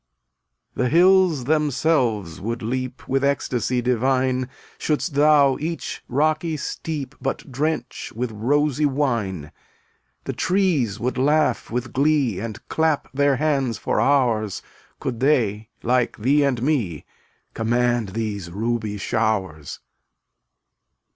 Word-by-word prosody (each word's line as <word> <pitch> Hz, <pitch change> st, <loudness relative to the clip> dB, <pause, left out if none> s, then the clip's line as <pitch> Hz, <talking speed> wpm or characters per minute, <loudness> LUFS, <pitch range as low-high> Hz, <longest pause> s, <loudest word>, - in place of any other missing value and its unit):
259 -, -, 0 dB
The 160 Hz, -, +2 dB
hills 180 Hz, -5 st, +5 dB
themselves 135 Hz, -, +1 dB
would 115 Hz, +3 st, -3 dB
leap 130 Hz, +2 st, -4 dB
With 135 Hz, +1 st, 0 dB
ecstasy 125 Hz, -3 st, 0 dB
divine 130 Hz, +1 st, +1 dB, 0.3 s
Shouldst 155 Hz, +1 st, -1 dB
thou 145 Hz, -2 st, +4 dB
each 165 Hz, +2 st, -4 dB
rocky 155 Hz, +4 st, 0 dB
steep 145 Hz, -2 st, -5 dB
But 135 Hz, +1 st, -4 dB
drench 140 Hz, -1 st, -2 dB
with 120 Hz, 0 st, -2 dB
rosy 145 Hz, +6 st, +1 dB
wine. 115 Hz, -, -1 dB, 0.7 s
The -, -, -4 dB
trees 170 Hz, -, +1 dB
would 125 Hz, +1 st, -2 dB
laugh 150 Hz, +3 st, +2 dB
with 120 Hz, +1 st, -3 dB
glee 140 Hz, -7 st, +2 dB
And 110 Hz, 0 st, -7 dB
clap 160 Hz, -5 st, 0 dB
their 140 Hz, 0 st, +3 dB
hands 135 Hz, -4 st, 0 dB
for -, -, 0 dB
hours 120 Hz, -7 st, +1 dB, 0.4 s
Could 120 Hz, -3 st, -4 dB
they, 110 Hz, -6 st, +1 dB
like 125 Hz, 0 st, +1 dB
thee 140 Hz, +7 st, +3 dB
and 125 Hz, -4 st, 0 dB
me, 115 Hz, -, -1 dB, 0.5 s
Command 120 Hz, -1 st, +1 dB
these 100 Hz, -3 st, -4 dB
ruby 110 Hz, +2 st, -2 dB
showers. 95 Hz, -8 st, -2 dB
130 Hz, 115 wpm, -22 LUFS, 115-145 Hz, 0.7 s, hills